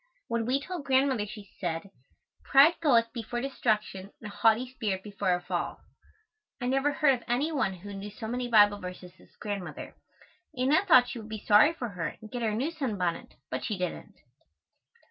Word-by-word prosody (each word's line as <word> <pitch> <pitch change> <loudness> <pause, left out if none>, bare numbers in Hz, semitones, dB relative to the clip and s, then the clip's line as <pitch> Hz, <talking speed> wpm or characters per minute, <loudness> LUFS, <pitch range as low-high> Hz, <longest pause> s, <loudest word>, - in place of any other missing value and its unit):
When 230 -1 -1
we 260 +2 +2
told 345 0 -6
Grandmother 260 -5 +2
she 210 -1 -11
said, 175 +1 -3 0.5
"Pride 280 +5 +6
goeth 235 -7 +3
before 240 0 -4
destruction 215 -7 -2
and 210 -2 -8
a - - -14
haughty 225 +2 +3
spirit 210 -7 -3
before 200 -3 0
a 175 - -5
fall." - - -3 0.8
I 245 - -4
never 270 +3 +2
heard 290 -1 +3
of 245 - -4
any 265 +7 0
one 260 -10 0
who 200 +3 -9
knew 200 +1 -6
so 220 +2 -7
many 245 +2 -2
Bible 205 -3 +5
verses 180 -1 -8
as - - -20
Grandmother. 200 -4 -6 0.6
Anna 275 +8 +3
thought 250 -8 +6
she 240 - -5
would 220 0 -10
be 215 -1 -7
sorry 220 +10 +6
for 245 -7 -4
her 180 -4 -5
and 215 - -12
get 245 - -4
her 225 - +1
a 210 - -2
new 270 +9 -1
sunbonnet, 205 - -3 0.2
but 130 - -3
she 210 - -2
didn't. 180 0 -5
225 Hz, 190 wpm, -29 LUFS, 200-260 Hz, 0.8 s, Pride